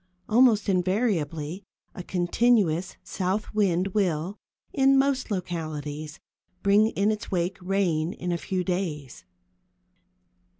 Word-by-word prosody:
Almost 225 -2 +4
invariably 185 - 0 0.3
a - - -7
continuous 180 -1 +1
south 190 +3 -2
wind 195 -3 +1
will, 185 -1 -1 0.3
in 270 0 +4
most 270 -1 +1
localities, 155 -5 -4 0.4
bring 205 +2 +5
in 210 -1 +1
its 215 -1 -5
wake 180 +1 -1
rain 180 -4 0
in 180 0 -4
a 170 - 0
few 185 +1 -2
days. 150 - -4
185 Hz, 110 wpm, -26 LUFS, 165-210 Hz, 0.4 s, bring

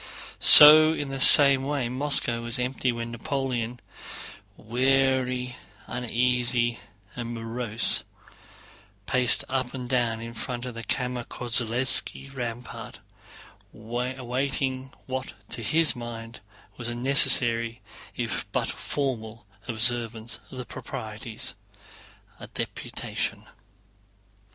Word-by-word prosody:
So 155 +1 +9
in 145 -3 -5
the 135 0 -6
same 140 0 +9
way 140 -3 -2
Moscow 130 -2 0
was 120 0 +1
empty 125 0 -2
when 115 0 -6
Napoleon, 120 -1 -4 0.8
weary, 130 +1 0 0.3
uneasy, 120 0 -1 0.4
and 120 -1 -6
morose, 115 0 -2 1.0
paced 125 +1 +1
up 130 0 -3
and 125 -1 -7
down 120 -3 -1
in 115 0 -9
front 120 +1 -6
of 125 - -7
the 115 0 -9
Kámmer 125 -1 -3
Kollézski 125 +3 0
rampart, 120 -1 -7 0.8
awaiting 130 +3 -4
what 130 -1 -6 0.2
to 120 - -7
his 155 +8 +1
mind 115 -1 -9 0.4
was 120 -1 -4
a 120 - -5
necessary, 120 -2 +2 0.4
if - - -5
but - - -2
formal, 115 -6 -5 0.2
observance 115 -1 +2
of 130 - -12
the 125 - -7
proprieties—a 110 0 -8
deputation. - - -5
125 Hz, 100 wpm, -25 LUFS, 115-130 Hz, 1.0 s, So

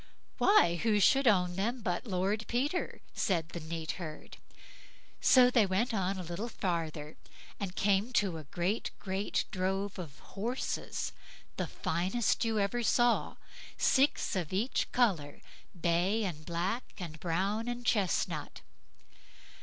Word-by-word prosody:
"Why! 170 - +5
who 215 -2 +3
should 270 +6 +5
own 180 -4 +3
them 235 +5 -1
but 180 +3 -2
Lord 200 +3 0
Peter", 285 +9 -1
said 170 -4 0
the 170 - -6
neat 160 -1 -4
herd. 155 -3 -8 0.8
So 250 -1 +6
they 230 -5 +4
went 205 +6 0
on 195 -2 0
a 185 - -4
little 175 +8 -4
further, 160 -7 -3 0.4
and 195 -2 -4
came 200 +4 +2
to 190 -8 +1
a 155 - -10
great, 180 +9 -1
great 195 +1 -1
drove 195 +1 -2
of 155 -6 -7 0.2
horses, 235 +6 -3 0.4
the - - -2
finest 195 +9 0
you 225 -1 0
ever 205 +4 +1
saw, 240 +1 +2 0.4
six 275 -4 +2
of 175 -5 -2
each 210 +8 0
colour, 175 - +1 0.4
bay, 180 +6 +2
and 155 -6 -5
black, 180 +8 -2
and 165 -4 -7
brown, 195 +7 -1
and 245 0 -4
chesnut. 200 -7 0
195 Hz, 135 wpm, -32 LUFS, 175-225 Hz, 0.8 s, So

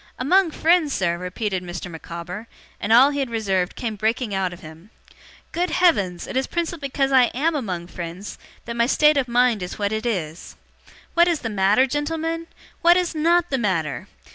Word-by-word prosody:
'Among 355 +8 +3
friends, 320 -2 +2
sir!' 170 -2 0
repeated 185 +2 -3
Mr. 175 0 -6
Micawber; 170 +6 -8 0.3
and 210 - -3
all 255 +5 +7
he 285 - -3
had 270 -3 -1
reserved 195 -5 -1
came 225 -3 -4
breaking 220 +1 -1
out 190 -2 -1
of 175 +1 -11
him. 160 +4 -13 0.6
'Good 355 +2 -1
heavens, 200 - +2
it - - -7
is 265 +1 0
principally 335 -4 -3
because 270 0 0
I 260 -2 +6
AM 315 +6 +1
among 190 - -3
friends 175 +3 -8 0.3
that 235 - -5
my 235 0 +2
state 300 +3 +4
of 275 -3 +1
mind 240 -3 +2
is 180 - -6
what 205 -1 -1
it 220 +2 -2
is. 170 -7 -4 0.6
What 340 0 +5
is 335 -4 0
the 225 - -4
matter, 205 +5 +3
gentlemen? 325 +4 -3 0.3
What 345 +1 +6
is 360 -2 0
NOT 335 +2 +2
the 265 - +1
matter? 165 -10 -2
235 Hz, 190 wpm, -22 LUFS, 185-300 Hz, 0.6 s, all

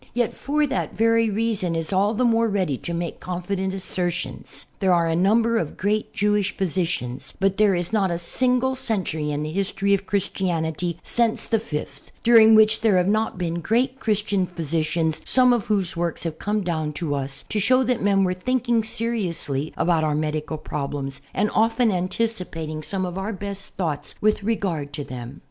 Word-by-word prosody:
yet 240 -2 +1
for 300 +2 0
that 270 -2 -3
very 230 0 +3
reason 205 -5 0
is 165 +3 -1
all 200 +3 +2
the 250 +3 +2
more 230 -1 +3
ready 190 -9 0
to 170 - -5
make 170 -1 -3
confident 185 +2 -3
assertions. 180 -2 -3
There 190 -2 +3
are 170 -1 +2
a 165 0 +1
number 225 +6 +3
of 155 - -4
great 210 +2 0
Jewish 205 -1 0
physicians, 165 -9 -2
but 195 0 +1
there 210 -3 +4
is 175 +4 -3
not 200 -3 +2
a 170 - -1
single 250 +8 +1
century 180 -11 -1
in 145 0 -2
the 155 - -4
history 195 +2 0
of 195 0 0
Christianity 175 -4 -1
since 235 -2 +1
the 225 - +1
fifth 150 -9 -6
during 225 -2 +7
which 220 0 +5
there 210 -4 +4
have 180 0 +2
not 215 0 +1
been 170 -1 -2
great 245 +8 +1
Christian 205 -4 0
physicians, 160 -1 -1
some 250 -1 +5
of 235 -4 -1
whose 195 -5 0
works 170 0 -2
have 165 -2 -4
come 210 +1 -1
down 160 -4 -2
to 150 -1 -2
us 135 0 -3
to 215 - 0
show 255 +6 +4
us - - +1
that 245 -2 +1
men 195 -1 +3
were 180 -1 +1
thinking 240 +3 0
seriously 180 - -2
about 165 -2 +2
our 150 -1 +1
medical 155 0 -2
prol)lems 140 -2 -5
and 210 +2 0
often 225 +1 +3
anticipating 180 -5 -2
some 185 +4 -2
of 180 +1 -4
our 200 +3 -3
best 200 0 -5
thoughts 160 -6 -3
with 215 0 +2
regard 185 -9 -2
to 145 - -4
them. 125 0 -8
190 Hz, 185 wpm, -23 LUFS, 165-220 Hz, -, during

